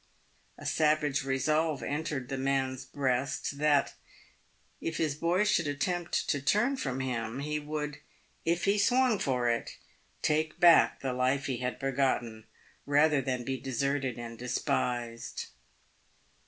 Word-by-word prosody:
A - - -11
savage 150 -2 +2
resolve 150 +3 0
entered 145 -3 -3
the 135 - -2
man's 135 -1 -1
breast, 135 +1 -1
that, 150 -1 +3 0.9
if 165 - -3
his 155 -3 +1
boy 170 +6 +1
should 175 -6 +2
attempt 175 +4 -1
to 145 - +1
turn 215 - +2
from 135 - -3
him, 120 -1 -3
he 150 +1 -2
would, 150 -1 -4 0.2
" - - -37
if 175 - -3
he 200 +1 +3
swung 245 0 +3
for 125 -3 0
it," 115 0 -1 0.5
take 155 +2 0
back 175 -2 +6
the 130 -2 -2
life 130 +2 +1
he 130 -3 -2
had 125 +1 -3
begotten, 125 -5 -1 0.4
rather 145 0 +4
than 125 -1 -2
be 130 +1 -3
deserted 135 0 -1
and 115 -1 -7
despised. 120 -1 -2
140 Hz, 140 wpm, -30 LUFS, 130-155 Hz, 0.9 s, back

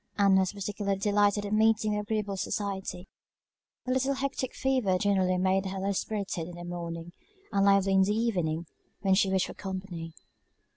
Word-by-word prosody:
Ann 200 -2 +5
was 190 0 +2
particularly 200 0 -2
delighted 205 0 +2
at 205 - -3
meeting 215 0 +3
with 210 - 0
agreeable 210 -2 -1
society; 190 -2 -3 0.8
a 255 - -1
little 265 +2 +1
hectic 270 -1 -3
fever 255 -9 +1
generally 185 -2 +2
made 190 +1 +1
her 190 +1 -4
low 195 +1 0
spirited 195 -4 -3
in 175 - -9
the 175 - -8
morning, 170 -1 -6 0.4
and 200 -1 +3
lively 195 -1 +4
in 190 - +5
the 190 +2 +3
evening, 180 -8 0 0.4
when 195 -2 +3
she 190 0 +3
wished 190 -1 +2
for - - -7
company. 185 -4 -6
195 Hz, 175 wpm, -29 LUFS, 185-210 Hz, 0.8 s, Ann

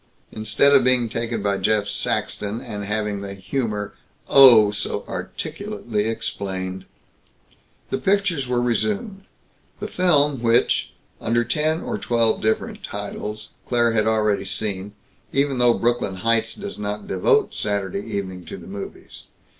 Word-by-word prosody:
Instead 110 +6 +2
of 135 -2 +6
being 125 -1 +3
taken 115 -1 -3
by 100 -1 0
Jeff 105 +1 +1
Saxton, 105 +2 -2
and 105 -5 -6
having 105 -1 -2
the 100 0 -6
humor, 105 0 -3 0.3
oh! 120 -7 +8
so 105 - -3
articulately 155 - -4
explained!" 95 -4 -4 1.1
The - - 0
pictures 190 -8 +1
were 125 -1 +1
resumed; 200 - -1 0.5
the - - -4
film 150 -7 +2
which, 120 +1 +2 0.3
under 120 +1 +1
ten 155 +7 0
or - - -3
twelve 115 -2 +1
different 110 0 -1
titles, 105 0 -6 0.2
Claire 120 -1 +2
had 110 -1 +1
already 105 -2 +2
seen, 100 0 -3 0.4
even 140 -2 +1
though 120 -1 +5
Brooklyn 120 -5 0
Heights 115 +3 +1
does 205 - -7
not 105 0 -4
devote 95 -1 +2
Saturday 100 -2 -2
evening 100 -4 -5
to - - -7
the 85 - -12
movies. 100 +1 -9
110 Hz, 135 wpm, -22 LUFS, 100-125 Hz, 1.1 s, oh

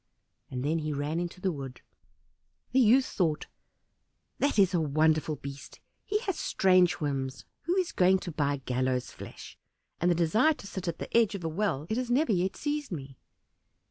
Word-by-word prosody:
And 125 +1 -4
then 160 +3 +1
he 155 -1 -3
ran 145 +3 -2
into 175 +1 -4
the 190 0 0
wood. 135 -5 -7 0.9
The 260 - +3
youth 255 +2 +5
thought, 155 -5 -1 0.9
"That 285 -3 +1
is 195 -2 +5
a 175 - +2
wonderful 155 +1 +2
beast, 140 -1 -9 0.2
he 420 - 0
has 390 -7 -3
strange 185 -2 +4
whims; 135 - -3 0.2
who 350 +3 +1
is 370 -2 +1
going 185 +1 +4
to 175 - -5
buy 145 -3 -1
gallows' 125 0 -1
flesh? - - -11 0.4
and 175 - +2
the 175 - +3
desire 215 - +3
to - - -12
sit 190 -2 -6
at 170 - -2
the - - -6
edge 230 -3 +4
of 190 - -6
a 165 - -1
well 160 -4 -1
it 220 - -1
has 250 -1 -2
never 255 +2 +2
yet 190 0 +1
seized 295 -2 -3
me." 135 -5 -7
175 Hz, 185 wpm, -29 LUFS, 145-215 Hz, 0.9 s, youth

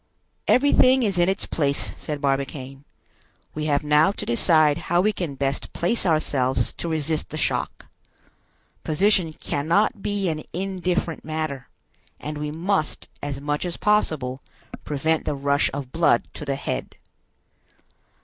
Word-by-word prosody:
"Everything 260 -1 +5
is 195 -5 +1
in 175 +1 +4
its 195 - -1
place," 140 -3 0
said 150 -1 -5
Barbicane. 135 0 -2 0.7
"We 155 0 -3
have 145 0 +1
now 150 +5 +4
to - - -6
decide 150 +4 +3
how 175 +1 +4
we 210 +4 +3
can 165 -8 -4
best 135 +1 -2
place 190 +3 0
ourselves 140 -5 +1
to 170 - -3
resist 160 -1 -1
the 155 - -5
shock. 150 - -1 1.0
Position 180 +1 +2
cannot 170 +8 0
be 205 -2 -1
an 155 -2 -1
indifferent 180 -3 -2
matter; 155 -4 -4 0.5
and 150 0 -5
we 150 0 -2
must, 165 +1 -1
as 140 -1 -4
much 145 +1 -2
as 175 -1 -4
possible, 150 -11 +1 0.4
prevent 155 +2 0
the 150 - -1
rush 140 +1 +2
of 135 -2 -5
blood 165 +1 +3
to 150 - -7
the 140 -1 -1
head." 140 - -4
155 Hz, 140 wpm, -24 LUFS, 140-180 Hz, 1.0 s, Everything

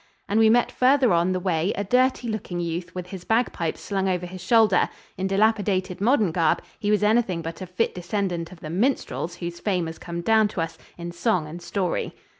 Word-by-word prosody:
And 210 +2 +2
we 220 -1 +6
met 240 +2 +3
farther 255 -4 +4
on 170 +2 +2
the 185 - 0
way 180 0 0
a 200 - -2
dirty 250 +3 +2
looking 210 -5 -4
youth 170 +1 -4
with 180 -1 -4
his 185 -2 -8
bagpipes 220 -7 0
slung 195 -1 -1
over 180 -1 -1
his 180 +1 -8
shoulder 215 -1 +4 0.3
in 190 +1 -2
dilapidated 195 -2 +1
modern 220 - +3
garb 165 -1 +1 0.2
he 205 -1 -1
was 210 0 +2
anything 210 -6 +2
but 165 +3 -6
a 185 - -5
fit 180 +6 -1
descendant 180 -2 -3
of 180 - -13
the 155 - -6
minstrels 185 -4 -1
whose 170 -1 -6
fame 185 -5 0
has 160 0 -7
come 170 -1 -5
down 220 +3 +4
to 200 -4 -4
us 165 0 -4 0.2
in 170 0 -6
song 180 -1 0
and 170 +3 -8
story. 180 0 -2
185 Hz, 210 wpm, -24 LUFS, 175-215 Hz, 0.3 s, we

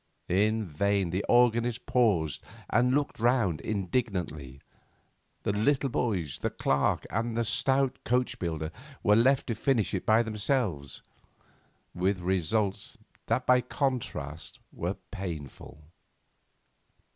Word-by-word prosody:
In 105 +4 +2
vain 95 +2 0
the 95 +3 -1
organist 120 0 +3
paused 95 - +2 0.3
and 125 +3 +3
looked 145 -4 -1
round 115 - +2
indignantly; 90 - -2 0.8
the - - +1
little 135 +6 +2
boys, 90 - -1
the - - -1
clerk, 70 0 0
and 115 +2 -1
the 115 - +1
stout 135 +3 +1
coach 125 +1 0
builder 80 -3 -3 0.3
were 105 - +5
left 130 +4 +4
to 120 - -2
finish 115 -1 +1
it 95 - -1
by 110 +2 +5
themselves, 105 - -2 0.9
with 95 +2 0
results 95 +3 -1 0.3
that 130 - 0
by 125 0 +5
contrast 120 - -3
were 90 +4 -3 0.2
painful. 80 -6 -7
105 Hz, 115 wpm, -29 LUFS, 90-120 Hz, 0.9 s, were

